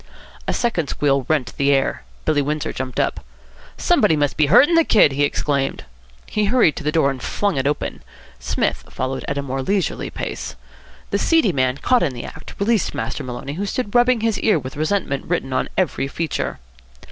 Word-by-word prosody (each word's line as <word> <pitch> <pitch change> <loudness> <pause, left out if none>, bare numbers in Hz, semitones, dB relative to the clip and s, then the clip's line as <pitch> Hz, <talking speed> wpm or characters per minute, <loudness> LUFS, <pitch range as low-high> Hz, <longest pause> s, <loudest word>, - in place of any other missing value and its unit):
A - - +1
second 200 -11 0
squeal 140 -3 +1
rent 145 -5 0
the 140 0 +3
air. 135 -1 +1 0.2
Billy 145 -2 +2
Windsor 150 +1 -2
jumped 130 -1 -4
up. - - -1 0.5
"Somebody 160 - +3
must 145 -2 0
be 155 -2 +3
hurting 260 - +6
the 330 0 +6
kid," 210 - +5
he 140 +1 -2
exclaimed. 140 -1 0 0.4
He 210 -1 0
hurried 210 -7 +3
to 165 - -5
the 150 - 0
door 155 -4 +3
and 130 -2 -7
flung 205 +7 -1
it 135 0 0
open. 145 - -2 0.4
Psmith - - -1
followed 130 +1 -3
at 140 - -2
a 140 - -1
more 135 0 -3
leisurely 195 +7 -1
pace. - - -5 0.6
The - - +1
seedy 325 - +3
man, 130 -1 +1
caught 250 - +2
in 140 -7 0
the 120 - -6
act, 160 - -10
released 215 0 +1
Master 145 - -3
Maloney, 130 +2 -5
who 200 +6 -3
stood 205 0 -3
rubbing 245 -1 +4
his 225 -1 0
ear 215 -6 +3
with 130 0 -6
resentment 155 -2 -1
written 160 -6 -2
on 130 - 0
every 175 -6 0
feature. 160 +2 -3
150 Hz, 195 wpm, -21 LUFS, 135-200 Hz, 0.6 s, hurting